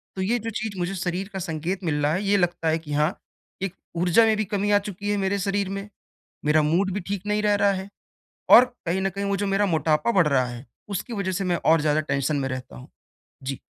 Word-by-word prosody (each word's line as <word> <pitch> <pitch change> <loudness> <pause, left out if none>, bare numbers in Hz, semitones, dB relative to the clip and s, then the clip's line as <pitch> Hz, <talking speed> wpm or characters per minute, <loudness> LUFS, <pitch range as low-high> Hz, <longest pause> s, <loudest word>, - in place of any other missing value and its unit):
तो 190 - -3
ये 235 +6 +1
जो 225 +1 -4
चीज़ 215 -2 -4
मुझे 180 +3 -2
शरीर 185 +2 -2
का 190 - -3
संकेत 170 +3 -3
मिल 150 -2 0
रहा 150 +2 +2
है 190 +3 -1
ये 200 0 +3
लगता 175 -2 0
है 160 +1 +1
कि 150 -2 -7
हाँ, 150 +4 +1 0.5
एक 195 -2 -2 0.2
ऊर्जा 180 +6 +4
में 220 -1 +3
भी 215 - 0
कमी 205 0 -1
आ 205 - +5
चुकी 205 0 -6
है 205 - +1
मेरे 195 +1 0
शरीर 195 0 -1
में। 195 +1 -5 0.6
मेरा 150 +1 +4
मूड 180 +6 +1
भी 205 - -2
ठीक 200 0 -3
नहीं 210 0 0
रह 210 -1 +3
रहा 200 - +5
है 190 +1 -5 0.6
और 250 - +10 0.2
कहीं 180 +3 0
न 195 - +1
कहीं 200 +2 -4
वो 200 0 0
जो 205 - -1
मेरा 195 +1 +2
मोटापा 160 +2 +1
बढ़ 180 -7 +4
रहा 130 -3 +2
है, 120 +2 -8 0.2
उसकी 205 +5 -4
वज़ह 200 -3 -2
से 195 +2 -2
मैं 180 -2 +1
और 160 -1 +5
ज़्यादा 150 0 +2
टेंशन 140 0 -1
में 135 -1 -1
रहता 130 - -6
हूँ। 65 - -12 0.5
जी। 135 0 -4
190 Hz, 250 wpm, -24 LUFS, 155-200 Hz, 0.6 s, और